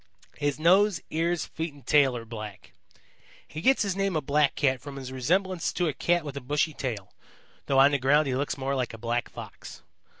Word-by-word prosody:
His 145 -1 0
nose, 185 +3 +4
ears, 165 +1 0
feet 160 -2 -5
and 140 -4 -17
tail 135 -4 +4
are 115 - -8
black. 110 -4 -9 0.7
He 155 - -7
gets 265 +4 +4
his 195 -3 -1
name 195 -2 0
of 155 - -1
Blackcat 140 -3 +2
from 140 0 -8
his 130 -2 -7
resemblance 180 +7 0
to 175 - 0
a 155 - -1
Cat 170 +4 +1
with 145 -2 -6
a 140 - -5
bushy 150 +4 0
tail, 115 -9 -5 0.5
though 135 - +2
on 135 +1 +7
the 140 - +1
ground 145 +4 +4
he 135 - -1
looks 140 +2 -2
more 135 0 -2
like 125 -4 -2
a - - -10
black 120 +2 -2
Fox. - - -10
145 Hz, 205 wpm, -27 LUFS, 130-165 Hz, 0.7 s, on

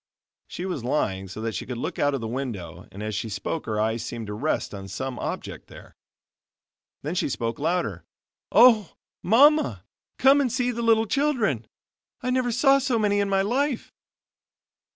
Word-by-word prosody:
She 180 - -6
was 180 -10 -3
lying 95 -7 -1
so 95 +4 -8
that 115 0 -2
she - - -5
could 125 -2 -4
look - - -4
out 145 -1 +2
of 135 - -4
the 115 - -3
window 105 - -5
and 100 +2 -8
as 110 0 -3
she 110 +3 -3
spoke 150 +9 -4
her 110 -1 -1
eyes 110 +1 0
seemed 120 -1 -5
to 105 - -6
rest 140 +4 -2
on 95 -1 -7
some 130 +6 -5
object - - -5
there. - - -14 1.1
Then 150 +4 -3
she 180 - 0
spoke 115 -3 -3
louder; 155 - -1 0.5
"OH, 220 -4 +6 0.3
MAMMA, 290 - +4 0.3
COME 275 +2 +5
AND 255 -4 0
SEE 250 0 0
THE 235 0 -4
LITTLE 225 -1 +4
CHILDREN! 225 - 0 0.5
I 255 - -2
never 255 -1 +1
saw 270 +3 +4
so 260 -3 0
many 205 -2 +2
in 200 -1 0
my 195 0 +2
life." 260 +4 -1
160 Hz, 180 wpm, -25 LUFS, -, 1.1 s, OH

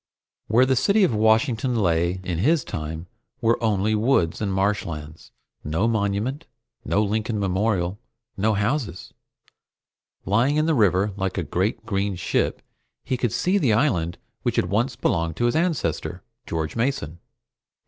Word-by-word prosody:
Where 120 +4 +4
the 130 0 +2
city 200 - +3
of 160 - +3
Washington 110 +3 +2
lay 85 -3 +1
in 90 -3 -3
his 145 - +3
time 80 +2 -5 0.3
were 115 +1 +1
only 105 -1 +1
woods 110 -7 +1
and 100 -2 -1
marshlands. 85 -6 -2 0.3
No 80 +9 0
Monument, 110 +6 -1 0.4
no 105 - +1
Lincoln 110 +1 -1
Memorial, 95 -1 0 0.4
no 105 +2 +1
houses. 105 - -2 1.1
Lying 120 +9 +2
in 155 0 +2
the 165 - +2
river 100 - +2
like 95 -1 -2
a 90 - 0
great 95 +7 -1
green 100 -2 -1
ship, - - -1 0.4
he 130 - -1
could 120 -3 -1
see 185 - +1
the 130 - +2
island 90 - +1 0.2
which - - -1
had 90 - 0
once 115 +6 +1
belonged 85 -3 0
to 120 - 0
his 120 - +1
ancestor, 165 -3 -1 0.2
George 80 -1 -3
Mason. 115 - -2
105 Hz, 150 wpm, -24 LUFS, 90-120 Hz, 1.1 s, Where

